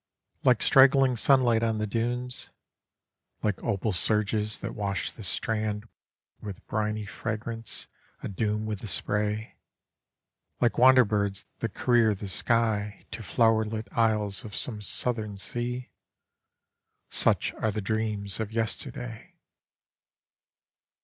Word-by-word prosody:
Like - - +4
strangling 135 -1 +6
sunlight 120 -2 +4
on 115 -1 +1
the 105 - -1
dunes, 120 +4 -2 0.9
Like 105 -3 0
opal 100 +2 0
surges 105 +2 +1
that - - -5
wash 100 -3 -2
the - - -12
strand 105 +2 -2 0.5
With 100 -3 -8
briny 105 -1 -2
fragrance, 115 +4 -4 0.4
adoom 105 +1 -1
with 105 -2 -3
the 110 - -7
spray, 105 +2 -1 1.0
Like 120 -1 +2
wander 130 0 +7
birds 100 -2 -1
that 115 -3 -3
career 115 -4 +3
the 100 0 -7
sky 105 -1 0
To 115 0 -6
flowerlit 110 0 +1
isles 105 -3 +1
of 105 -2 -8
some 110 -4 -3
Southern 105 0 -1
sea 120 +5 -3 1.2
Such - - +2
are 110 - -1
the 105 +1 -2
dreans 105 -1 -2
of 110 -1 -3
yesterday! 115 0 -4
110 Hz, 115 wpm, -28 LUFS, 105-115 Hz, 1.2 s, wander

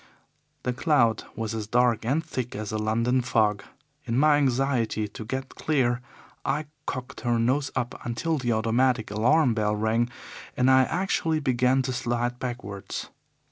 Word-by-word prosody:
The 125 - -1
cloud 125 -5 +2
was 110 0 -3
as 110 -2 -4
dark 120 -1 +2
and 150 +7 0
thick 130 -6 -4
as 105 0 -4
a 110 - -2
London 115 +4 +1
fog. 110 -4 +1 0.4
In 115 -1 -1
my 150 +1 +5
anxiety 130 -5 +1
to 105 +2 -8
get 130 +4 -5
clear, 125 -5 +1 0.4
I 150 +3 -1 0.2
cocked 130 +1 -5
her 120 -1 +1
nose 130 +5 +1
up 120 +1 -3
until 150 +7 -1
the 120 -2 0
automatic 115 +1 +1
alarm 125 +5 +3
bell 105 -1 0
rang, 110 +3 +1 0.5
and 125 +1 +4
I 130 0 +6
actually 165 -2 0
began 130 -1 +2
to 130 - -2
slide 120 0 -1
backwards. 100 -6 -5
120 Hz, 155 wpm, -26 LUFS, 115-130 Hz, 0.5 s, I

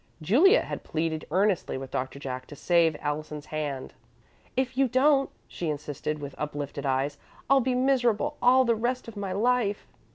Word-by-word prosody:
Juliet 285 - +5
had - - -6
pleaded 160 0 -2
earnestly 185 -2 +1
with 130 0 -7
Doctor 130 +2 -3
Jack 130 -2 -6
to 145 - -10
save 165 0 +2
Allison's 150 0 -4
hand. 145 -4 -4 0.6
"If 260 -1 0
you 270 0 +3
don't," 275 +3 +3 0.2
she 155 -4 -3
said, 150 +1 -4
with 140 -2 -7
uplifted 145 -1 -4
eyes, 135 +2 0 0.3
"I'll 275 0 +5
be 255 0 0
miserable 255 +1 +2
all 255 +1 +5
the 235 - +3
rest 240 +3 -2
of 230 - -9
my 200 -2 -4
life." 215 0 +1
175 Hz, 165 wpm, -27 LUFS, -, 0.6 s, Juliet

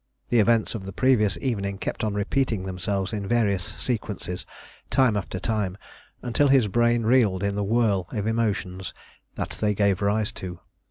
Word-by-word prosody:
The 120 - +4
events 115 0 +3
of 100 -5 -6
the 95 - -6
previous 105 -8 +3
evening 100 -6 -2
kept - - -4
on 105 -2 -1
repeating 110 0 0
themselves 95 +2 -2
in 100 -2 -3
various 105 -5 +2
sequences 100 -7 -4 0.4
time 125 -5 +3
after 95 -3 -3
time, 100 -2 -1 0.5
until 125 +4 +2
his 135 -5 +5
brain 120 +3 +2
reeled 110 -5 +3
in 100 0 0
the 100 0 -1
whirl 100 -4 +1
of 105 -2 -2
emotions 100 -5 -1 0.4
that - - -3
they 105 -1 +2
gave 100 -2 +2
rise 105 +1 +1
to. 90 -2 -6
105 Hz, 165 wpm, -25 LUFS, 95-115 Hz, 0.5 s, his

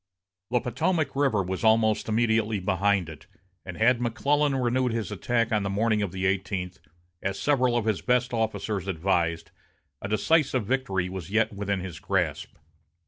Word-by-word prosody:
The 125 +1 +2
Potomac 135 +5 -1
River 135 -8 +2
was 95 +3 -4
almost 110 0 +3
immediately 110 -1 +1
behind 95 0 +1
it, 80 -3 -11 0.4
and 95 -2 -8
had 120 +2 +3
McClellan 140 +5 +1
renewed 125 -1 +1
his 115 -5 -3
attack 115 -1 0
on 105 -1 +2
the 100 - -2
morning 105 +2 +1
of 100 -4 -2
the 95 +1 -3
eighteenth, 95 -1 -2 0.4
as 100 0 -2
several 125 +2 +2
of 115 - -1
his 110 -3 0
best 125 0 +1
officers 110 -3 -2
advised, 85 -2 -1 0.5
a - - -4
decisive 130 +3 +2
victory 100 -7 -1
was 90 -2 -7
yet 110 +1 +1
within 100 -1 -2
his 90 -3 -7
grasp. - - -2
110 Hz, 160 wpm, -26 LUFS, 95-120 Hz, 0.5 s, almost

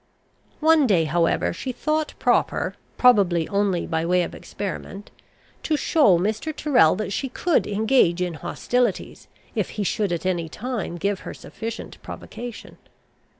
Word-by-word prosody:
One 315 -3 +5
day, 180 -7 +3
however, 165 +2 +1
she 255 +9 -4
thought 305 +5 -1
proper, - - +1 0.2
probably 195 -10 +4
only 200 -3 +1
by 160 -1 -1
way 180 +1 +2
of - - -5
experiment, 200 0 -7 0.5
to 310 - 0
show 285 - +4
Mr. 215 - -1
Tyrrel 245 - +4
that 205 0 -3
she 270 - -2
could 335 +5 +1
engage 210 -4 +2
in 180 -1 -1
hostilities, 240 - -2 0.3
if 210 -6 -1
he 210 - 0
should 200 0 0
at 170 0 -3
any 175 -3 -1
time 225 -2 -4
give 200 +2 -1
her - - -8
sufficient 225 +1 -7
provocation. 240 -1 -9
205 Hz, 145 wpm, -23 LUFS, 175-250 Hz, 0.5 s, One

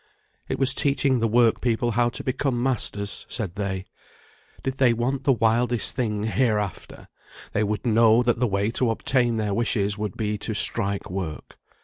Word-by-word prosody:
It - - -1
was 130 0 +2
teaching 140 -2 +1
the 115 - +1
work 115 0 +3
people 120 0 0
how 120 +1 +2
to - - -6
become 130 -1 -1
masters, 105 -6 -1
said 105 -8 -3
they. 95 -2 -3 0.8
Did 135 0 -3
they 125 -3 +5
want 130 +4 -2
the 140 - +5
wildest 120 0 +1
thing 105 -5 -1
heareafter, 105 -2 -1 0.5
they 110 - 0
would 105 +2 -2
know 115 +1 +4
that 120 -1 +1
the 125 - +2
way 100 +1 0
to 125 0 0
obtain 120 +1 +1
their 105 -2 -1
wishes 105 -2 0
would 105 -2 -4
be 105 -1 -2
to 110 +1 -2
strike 100 -3 0
work. 90 -5 -6
115 Hz, 170 wpm, -24 LUFS, 105-125 Hz, 0.8 s, they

